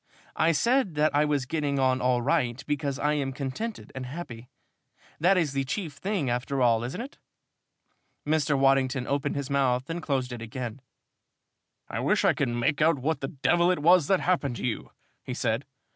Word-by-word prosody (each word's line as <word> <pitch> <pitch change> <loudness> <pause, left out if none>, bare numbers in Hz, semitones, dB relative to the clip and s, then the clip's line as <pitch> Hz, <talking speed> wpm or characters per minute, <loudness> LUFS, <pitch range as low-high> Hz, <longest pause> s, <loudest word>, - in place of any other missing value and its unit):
"I 165 - +3
said 235 - +2
that 150 0 +2
I 150 +1 +4
was 145 -3 0
getting 145 0 -1
on 130 -1 +2
all 125 -1 +2
right 125 -4 0
because 145 -2 -2
I 150 +1 +1
am 140 -3 -1
contented 140 - -5
and 130 -1 -6
happy. 125 -5 -8 0.7
That 180 +4 +4
is 155 -6 +1
the 135 0 0
chief 155 +3 -4
thing 190 -1 -2
after 125 +3 -1
all, 115 -2 +3
isn't 125 - -4
it?" 260 +4 -8 1.1
Mr. 150 -1 +1
Waddington 135 -1 +2
opened 140 +1 -1
his 140 -1 -4
mouth 130 -2 +1
and 170 +1 -3
closed 135 -5 -1
it 120 - -7
again. 120 +1 -6 1.1
"I - - -4
wish - - +2
I - - +5
could - - -1
make 120 +6 0
out 160 0 +4
what 140 +2 -1
the 135 - -2
devil 170 +6 +2
it 185 - +2
was 170 0 +5
that 190 -2 +3
happened 150 -8 0
to - - -4
you," 120 - -3 0.3
he - - -6
said. - - -1
140 Hz, 190 wpm, -27 LUFS, 130-160 Hz, 1.1 s, I